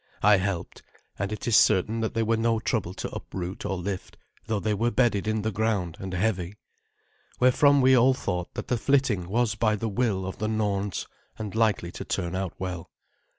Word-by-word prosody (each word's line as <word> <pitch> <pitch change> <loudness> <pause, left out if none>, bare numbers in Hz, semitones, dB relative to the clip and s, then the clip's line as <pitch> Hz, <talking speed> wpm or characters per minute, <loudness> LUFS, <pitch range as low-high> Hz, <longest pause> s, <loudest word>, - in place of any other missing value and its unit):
I 105 0 +7
helped, 95 -2 -3 0.4
and 100 +1 -2
it 110 +4 -5
is 115 - +3
certain 105 +5 +4
that 110 -1 -2
they 115 - +2
were 115 +1 +2
no 115 0 +1
trouble 105 -6 -2
to - - -5
uproot 90 0 -5
or 95 - -2
lift, 95 +1 -5 0.3
though 110 -2 0
they 110 +1 0
were 115 +4 +1
bedded 120 -5 +1
in 110 -1 0
the 110 - 0
ground 100 -5 -1
and 95 -1 -5
heavy. 95 -1 -1 0.8
Wherefrom 140 +3 +5
we 130 0 +6
all 130 +2 +5
thought 90 -7 -3
that - - -5
the 125 - 0
flitting 120 -10 +1
was 115 +1 +1
by 110 0 +1
the 110 +2 -3
will 100 -3 0
of 95 - -6
the 110 - -1
Norns, 105 -3 -1 0.3
and 105 -3 -5
likely 110 -6 +1
to - - -7
turn 85 +1 -2
out 95 -2 -3
well. 90 -3 -5
105 Hz, 195 wpm, -26 LUFS, 95-115 Hz, 0.8 s, I